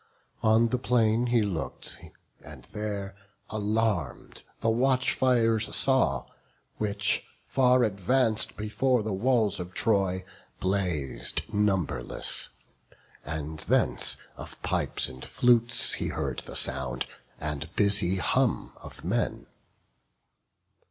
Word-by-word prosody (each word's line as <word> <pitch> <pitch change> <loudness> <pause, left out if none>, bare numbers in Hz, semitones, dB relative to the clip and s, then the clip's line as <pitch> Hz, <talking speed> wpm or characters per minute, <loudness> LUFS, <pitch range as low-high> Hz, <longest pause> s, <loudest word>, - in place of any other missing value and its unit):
On 115 +1 +4
the 125 - 0
plain 120 -1 +2
He 120 -2 +3
look'd, 95 -6 -4 0.5
and - - -12
there, 100 -2 -4 0.4
alarm'd, 105 - -1 0.2
the 115 - +2
watchfires 125 -2 +2
saw, 100 - +3 0.5
Which, 105 -1 +1 0.2
far 125 -1 +3
advanc'd 110 +3 +1
before 110 +3 +1
the 105 -1 -2
walls 110 0 +2
of 90 +1 -7
Troy, 95 -4 +1 0.3
Blaz'd 90 -8 -1
numberless; 100 -5 +1 0.7
and 75 +1 -5
thence - - +1 0.2
of - - -10
pipes - - +1
and 65 0 -9
flutes 120 -1 +2
He - - -3
heard - - -3
the - - -9
sound, 65 -1 0 0.3
and 75 0 -4
busy 100 -3 +2
hum 90 - 0
of - - -12
men. - - -1
105 Hz, 105 wpm, -28 LUFS, 95-115 Hz, 0.7 s, On